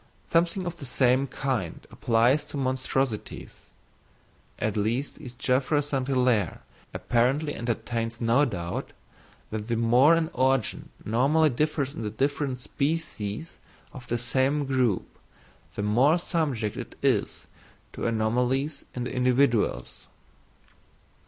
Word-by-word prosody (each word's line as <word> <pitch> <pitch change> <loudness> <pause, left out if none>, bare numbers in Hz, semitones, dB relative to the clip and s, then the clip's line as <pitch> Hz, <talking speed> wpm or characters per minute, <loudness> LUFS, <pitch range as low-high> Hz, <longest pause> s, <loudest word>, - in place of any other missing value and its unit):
Something 170 +2 +2
of 175 -1 -4
the 140 - -8
same 130 +2 +2
kind 125 - -3
applies 120 +6 +2
to 150 - -7
monstrosities: 130 -3 -2 0.9
at 110 -2 -1
least 115 +7 -1
Is. 125 -1 -9
Geoffroy 135 +4 +1
St. 135 -3 -2
Hilaire 125 -5 +1 0.3
apparently 135 +6 +1
entertains 115 0 -3
no 120 +4 +3
doubt, 90 -10 -3 0.6
that 110 0 -4
the 120 - 0
more 120 +8 +5
an 165 0 0
organ 130 -2 0 0.2
normally 140 +8 +3
differs 145 +1 -1
in - - -6
the 105 - -2
different 135 +3 -1
species 140 -3 -3 0.3
of 125 -3 -10
the 120 - 0
same 130 +4 +1
group, 130 -7 0 0.6
the 100 - -2
more 125 +10 +4
subject 145 - -1
it - - -7
is - - 0 0.5
to - - -3
anomalies 125 +6 0
in 125 - -2
the 125 - -4
individuals. 125 - +1
130 Hz, 120 wpm, -27 LUFS, 115-145 Hz, 0.9 s, more